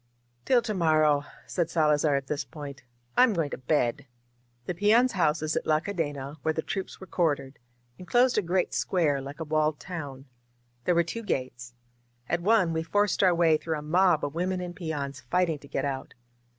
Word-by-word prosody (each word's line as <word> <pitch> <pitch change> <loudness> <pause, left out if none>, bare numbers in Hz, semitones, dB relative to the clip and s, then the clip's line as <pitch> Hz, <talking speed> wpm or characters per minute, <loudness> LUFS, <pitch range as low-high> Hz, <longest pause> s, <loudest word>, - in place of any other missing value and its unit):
"Till 245 -2 +4
to 220 - -2
morrow," 155 -5 +3 0.2
said 170 -2 -1
Salazar 150 -2 +2
at 140 -1 -1
this 145 +1 -2
point, 140 0 -9 0.3
"I'm 250 -3 +5
going 165 -6 -1
to - - -4
bed!" 130 -2 0 0.6
The 180 - -2
peons' 220 +7 +4
houses 155 -4 +1
at - - -2
La 155 0 +4
Cadena, 145 -6 -4
where 160 0 0
the 160 - -2
troops 195 -2 -5
were 190 - -9
quartered, 150 -6 -1 0.4
enclosed 240 +8 +3
a - - +1
great 180 0 0
square, 150 -7 +1
like 140 +3 -8
a - - -2
walled 155 -1 0
town. 145 -7 -7 0.6
There 180 - +3
were 170 - +4
two 230 +8 -5
gates. 130 - -4 0.5
At 175 0 0
one 190 -3 +3
we 160 - 0
forced 205 +5 +1
our 185 -3 +5
way 165 -2 +4
through 160 0 -3
a 150 - -7
mob 175 0 +3
of 145 - -5
women 180 +2 -1
and 180 -1 -6
peons 145 -6 -4
fighting 175 -3 +1
to 140 - -14
get 135 - -2
out. 135 -1 -4
160 Hz, 190 wpm, -27 LUFS, 145-180 Hz, 0.6 s, I'm